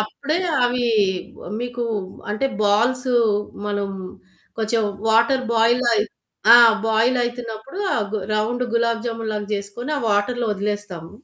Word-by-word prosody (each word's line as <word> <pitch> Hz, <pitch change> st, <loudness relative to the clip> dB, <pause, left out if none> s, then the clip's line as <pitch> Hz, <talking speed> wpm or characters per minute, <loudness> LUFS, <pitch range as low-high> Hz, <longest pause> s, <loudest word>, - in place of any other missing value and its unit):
అప్పుడే 280 Hz, +9 st, -2 dB, 0.3 s
అవి 245 Hz, 0 st, +1 dB, 0.7 s
మీకు 245 Hz, 0 st, -3 dB, 0.5 s
అంటే 215 Hz, +6 st, 0 dB, 0.2 s
బాల్స్ 240 Hz, +6 st, +2 dB, 0.6 s
మనం 205 Hz, -1 st, -2 dB, 0.7 s
కొంచెం 225 Hz, 0 st, +1 dB, 0.3 s
వాటర్ 235 Hz, +4 st, +3 dB
బాయిల్ 235 Hz, +3 st, +3 dB
అయి 210 Hz, -1 st, +2 dB, 0.5 s
ఆ -, -, +11 dB, 0.3 s
బాయిల్ 225 Hz, +3 st, +2 dB
అవుతున్నప్పుడు 240 Hz, -, -5 dB
ఆ -, -, +1 dB, 0.4 s
రౌండ్ 230 Hz, +4 st, 0 dB
గులాబ్ 230 Hz, -1 st, +1 dB
జామున్ 225 Hz, -1 st, -3 dB
లాగా 210 Hz, -1 st, -3 dB
చేసుకొని 205 Hz, +7 st, -5 dB
ఆ -, -, 0 dB
వాటర్ 205 Hz, +5 st, +1 dB
లో -, -, 0 dB
వదిలేస్తాము. 205 Hz, -4 st, -4 dB
230 Hz, 125 wpm, -21 LUFS, 210-245 Hz, 0.7 s, ఆ